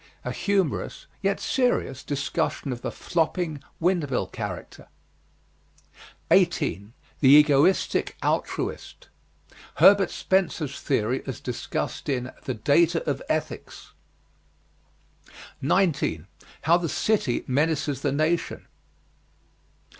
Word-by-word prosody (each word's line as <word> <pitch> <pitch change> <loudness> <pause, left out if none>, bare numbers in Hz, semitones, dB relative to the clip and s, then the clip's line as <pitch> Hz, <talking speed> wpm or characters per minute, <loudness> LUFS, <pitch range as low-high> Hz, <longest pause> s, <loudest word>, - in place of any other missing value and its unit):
A 125 - -2
humorous, 190 +1 -1 0.2
yet 195 0 0
serious, 245 - 0
discussion 140 -1 -2
of 120 - -8
the - - -3
flopping, 165 -3 -1 0.2
wind 170 -4 +1
mill 125 - 0
character. - - -7 1.4
18. 100 +6 +2 0.3
THE 135 - +5
EGOISTIC 150 +4 +3
ALTRUIST. - - -3 0.7
Herbert 200 -1 +6
Spencer's 160 -7 -1
theory 130 -1 0
as 130 - -5
discussed 125 +3 -4
in 125 -2 -2
"The 130 - -2
Data 165 +8 +2
of 140 -2 -1
Ethics." 155 - -4 1.7
19. 140 - +1 0.4
HOW 165 +3 +5
THE 170 -2 -3
CITY 205 - 0
MENACES 145 0 0
THE 140 - 0
NATION. 155 +4 -1
150 Hz, 95 wpm, -25 LUFS, 135-175 Hz, 1.7 s, Herbert